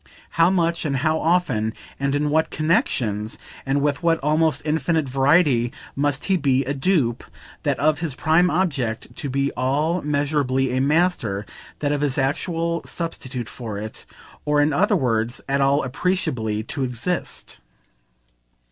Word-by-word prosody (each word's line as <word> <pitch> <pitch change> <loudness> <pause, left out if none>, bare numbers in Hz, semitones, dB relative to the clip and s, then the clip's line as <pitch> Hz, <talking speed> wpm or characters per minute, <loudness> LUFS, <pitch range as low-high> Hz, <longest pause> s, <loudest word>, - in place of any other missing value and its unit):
How 165 +1 +4
much 170 -3 +1
and 140 -3 0
how 160 0 +2
often, 135 -11 +1 0.3
and 140 0 0
in 145 0 0
what 160 +1 +2
connexions 115 - 0 0.3
and 140 +1 +1
with 145 -1 0
what 165 -1 +3
almost 155 +1 +2
infinite 155 0 +1
variety, 135 -2 +3 0.2
must 145 0 0
he 190 -2 +2
be 135 -4 +1
a 140 - -1
dupe, 135 -5 +1 0.4
that - - 0
of 150 +1 +2
his 160 -5 -3
prime 160 +5 +3
object, 140 -11 -1
to 140 - -3
be 140 +1 0
at - - -11
all 150 +7 +1
measurably 140 -3 0
a 130 - +1
master, 140 - +1 0.4
that 145 -1 +1
of 145 -1 0
his 145 0 0
actual 165 +4 -1
substitute 130 -8 -5
for 115 -6 -6
it 110 +1 -7 0.4
or 150 0 +2
in 145 +1 +3
other 205 +7 +3
words 120 - 0
at 140 0 +1
all 140 +2 +3
appreciably 125 - -1
to 135 +5 -3
exist? 125 +8 -3
145 Hz, 155 wpm, -22 LUFS, 130-160 Hz, 0.4 s, How